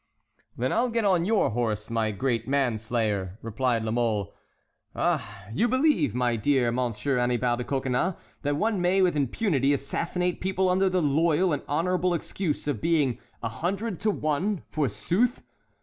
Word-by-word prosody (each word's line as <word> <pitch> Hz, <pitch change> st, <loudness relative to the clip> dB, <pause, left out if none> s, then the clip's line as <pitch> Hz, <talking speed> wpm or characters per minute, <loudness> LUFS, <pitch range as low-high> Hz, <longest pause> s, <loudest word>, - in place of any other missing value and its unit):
"Then 125 Hz, +2 st, 0 dB
I'll 245 Hz, +2 st, +2 dB
get 230 Hz, -2 st, 0 dB
on 180 Hz, -4 st, +3 dB
your 215 Hz, -, +2 dB
horse, 110 Hz, -2 st, -2 dB
my 115 Hz, -1 st, +1 dB
great 115 Hz, +2 st, -1 dB
man 135 Hz, -5 st, +1 dB
slayer," 105 Hz, -4 st, -1 dB
replied 115 Hz, +1 st, 0 dB
La 110 Hz, -, -2 dB
Mole. 115 Hz, -4 st, 0 dB, 0.6 s
"Ah, 100 Hz, -2 st, -1 dB
you 230 Hz, -, +2 dB
believe, 260 Hz, -, +2 dB
my 125 Hz, -1 st, +1 dB
dear 120 Hz, +1 st, +2 dB
Monsieur 125 Hz, +2 st, -1 dB
Annibal 120 Hz, 0 st, +1 dB
de 125 Hz, -, -3 dB
Coconnas, 135 Hz, +6 st, 0 dB, 0.3 s
that 145 Hz, 0 st, 0 dB
one 210 Hz, +3 st, 0 dB
may 185 Hz, +2 st, +3 dB
with 180 Hz, -3 st, +2 dB
impunity 145 Hz, -, +1 dB
assassinate 170 Hz, +6 st, -2 dB
people 190 Hz, 0 st, +1 dB
under 190 Hz, +1 st, +3 dB
the 185 Hz, -2 st, +1 dB
loyal 160 Hz, +4 st, +2 dB
and 145 Hz, -, -1 dB
honorable 180 Hz, +4 st, +1 dB
excuse 165 Hz, -2 st, -3 dB
of 135 Hz, -8 st, -1 dB
being 145 Hz, -7 st, +1 dB, 0.2 s
a 115 Hz, -, -1 dB
hundred 190 Hz, -, -3 dB
to 215 Hz, -, +1 dB
one, 180 Hz, +2 st, -1 dB
forsooth! 155 Hz, -, 0 dB
140 Hz, 160 wpm, -26 LUFS, 120-180 Hz, 0.6 s, on